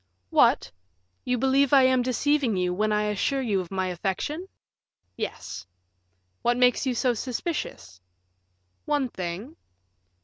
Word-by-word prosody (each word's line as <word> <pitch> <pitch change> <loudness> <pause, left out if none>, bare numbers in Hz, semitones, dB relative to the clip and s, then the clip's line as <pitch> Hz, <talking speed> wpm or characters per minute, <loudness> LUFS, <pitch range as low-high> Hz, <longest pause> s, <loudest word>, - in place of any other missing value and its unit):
"What! - - +4 0.5
you 250 0 +1
believe 270 +2 +3
I 270 -2 +7
am 260 -1 +4
deceiving 255 -2 +1
you, 180 -1 0
when 215 +3 0
I 210 0 +2
assure 210 +6 0
you 210 -5 +1
of 175 - -9
my 190 -1 -1
affection?" 195 - -3 0.7
"Yes." 90 - -6 0.7
"What 240 0 +2
makes 250 +2 +3
you 255 - 0
so 245 +1 +2
suspicious?" 240 - -4 0.8
"One 290 -4 0
thing." 190 - -6
245 Hz, 130 wpm, -26 LUFS, 195-270 Hz, 0.8 s, I